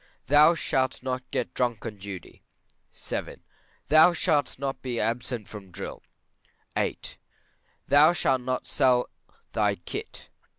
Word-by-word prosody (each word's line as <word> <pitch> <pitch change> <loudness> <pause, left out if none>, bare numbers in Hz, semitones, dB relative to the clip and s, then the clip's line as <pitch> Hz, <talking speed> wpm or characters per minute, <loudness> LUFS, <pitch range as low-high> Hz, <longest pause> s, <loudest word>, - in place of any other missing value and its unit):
Thou 150 +4 +6
shalt 130 -5 -1
not 130 -1 -3
get 120 - -2
drunk 120 -3 -1
on 110 -2 -5
duty. 100 -2 -9 0.5
VII. - - -6 0.4
Thou 155 +4 +7
shalt 150 -6 +1
not 135 0 -4
be 125 -3 -3
absent 115 0 -2
from 100 -3 -10
drill. 95 +2 -7 0.7
VIII. - - 0 0.9
Thou 145 +4 +7
shalt 135 -7 +1
not 130 0 -2
sell 125 -3 +2 0.4
thy - - +2
kit. - - -8
130 Hz, 125 wpm, -27 LUFS, 115-145 Hz, 0.9 s, Thou